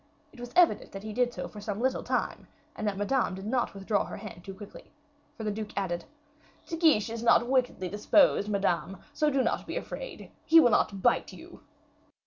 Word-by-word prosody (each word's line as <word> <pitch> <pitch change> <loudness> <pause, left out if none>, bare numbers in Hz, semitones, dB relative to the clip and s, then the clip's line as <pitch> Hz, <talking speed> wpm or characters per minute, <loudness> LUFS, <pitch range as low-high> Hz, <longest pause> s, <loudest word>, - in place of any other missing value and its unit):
It 265 - -15
was 245 0 -8
evident 355 -2 +3
that 195 0 -7
he 215 0 -6
did 245 +1 +1
so - - -5
for 210 - -11
some 205 0 -4
little 260 +2 0
time, - - -2 0.3
and 215 - -3
that 200 -2 -1
Madame 205 -1 0
did 190 +1 -8
not 240 -1 -1
withdraw 200 +1 0
her - - -7
hand 185 -5 -10
too 195 0 -8
quickly, 205 +1 -12 0.5
for 225 - -6
the 210 - -1
duke 210 -1 -6
added: 175 -3 -2 0.6
"De 330 - -4
Guiche 310 - +3
is 230 0 -5
not 235 0 +4
wickedly 250 -7 0
disposed, 210 - +3
Madame; 195 -2 0 0.2
so 300 +1 +2
do 270 -2 +1
not - - -1
be - - -3
afraid, - - -7
he 325 +1 +7
will 245 -7 +5
not 195 -2 +1
bite - - +2
you." - - -13
215 Hz, 205 wpm, -29 LUFS, 200-255 Hz, 0.6 s, he